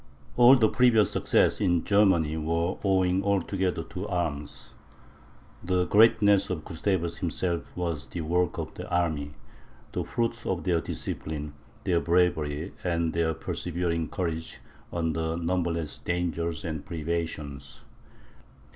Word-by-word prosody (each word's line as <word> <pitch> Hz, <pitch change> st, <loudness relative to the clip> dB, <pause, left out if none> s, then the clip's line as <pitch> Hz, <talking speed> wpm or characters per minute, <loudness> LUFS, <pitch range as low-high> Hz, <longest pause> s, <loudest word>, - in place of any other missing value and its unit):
All 120 Hz, +2 st, +8 dB
the 115 Hz, -4 st, +4 dB
previous 115 Hz, -3 st, +4 dB
successes -, -, +2 dB
in 90 Hz, -4 st, +2 dB
Germany 95 Hz, -7 st, +3 dB
were 85 Hz, +3 st, -1 dB
owing 95 Hz, -1 st, +2 dB
altogether 95 Hz, -3 st, 0 dB
to 95 Hz, +3 st, -6 dB
arms; 80 Hz, -6 st, -4 dB, 0.9 s
the 90 Hz, 0 st, +1 dB
greatness 105 Hz, 0 st, +5 dB
of 85 Hz, -4 st, -4 dB
Gustavus 85 Hz, 0 st, -1 dB
himself 85 Hz, -2 st, -2 dB
was 85 Hz, -5 st, -3 dB
the 85 Hz, +6 st, -5 dB
work 90 Hz, +3 st, 0 dB
of -, -, -5 dB
the -, -, -8 dB
army, 80 Hz, -5 st, -1 dB, 0.6 s
the -, -, -2 dB
fruit 115 Hz, 0 st, -2 dB
of 90 Hz, -2 st, -1 dB
their 85 Hz, -3 st, +1 dB
discipline, 75 Hz, -3 st, -4 dB, 0.3 s
their 90 Hz, -3 st, +2 dB
bravery, 85 Hz, -2 st, +1 dB
and 85 Hz, -2 st, 0 dB
their 80 Hz, -1 st, +1 dB
persevering 85 Hz, -1 st, -2 dB
courage 80 Hz, -3 st, -3 dB, 0.3 s
under 80 Hz, -1 st, -1 dB
numberless 85 Hz, -2 st, -1 dB
dangers 85 Hz, 0 st, -2 dB
and 80 Hz, -3 st, -4 dB
privations. 75 Hz, -4 st, -4 dB
85 Hz, 120 wpm, -27 LUFS, 80-95 Hz, 0.9 s, All